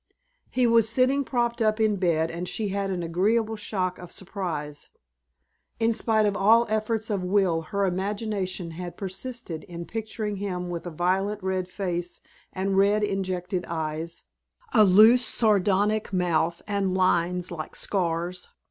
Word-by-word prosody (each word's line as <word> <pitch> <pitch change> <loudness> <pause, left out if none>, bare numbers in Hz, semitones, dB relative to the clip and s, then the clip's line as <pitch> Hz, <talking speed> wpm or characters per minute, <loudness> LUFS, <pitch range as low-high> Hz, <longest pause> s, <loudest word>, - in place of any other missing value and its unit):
He 255 -1 +1
was 230 -2 +4
sitting 260 +4 +2
propped 240 -2 -1
up 215 0 +2
in 215 -2 +2
bed 165 -3 +1
and 175 +2 -4
she 215 -2 -2
had 200 0 -2
an 180 -2 -2
agreeable 215 +7 +1
shock 185 -4 -2
of 180 -1 -10
surprise. 170 -7 -5 0.9
In 230 0 +3
spite 220 -1 +2
of 205 -1 +1
all 225 +4 +5
efforts 220 0 -1
of 195 -3 -1
will 180 -3 +2
her 200 +5 -1
imagination 190 -1 -2
had 175 +1 -7
persisted 195 -2 -5
in 170 -1 -7
picturing 220 -1 -4
him 180 -3 -3
with 175 0 -5
a - - -2
violent 190 +5 -1
red 190 -1 -1
face 175 -2 -4 0.3
and 195 +1 -1
red 205 +2 +3
injected 185 -2 -2
eyes, 160 0 -3 0.5
a 220 -4 +7
loose 215 +6 +7
sardonic 210 -1 +2
mouth 170 -2 0
and 200 -3 -1
lines 180 -1 +1
like 155 -3 -6
scars. 175 -1 -2
195 Hz, 150 wpm, -26 LUFS, 180-215 Hz, 0.9 s, a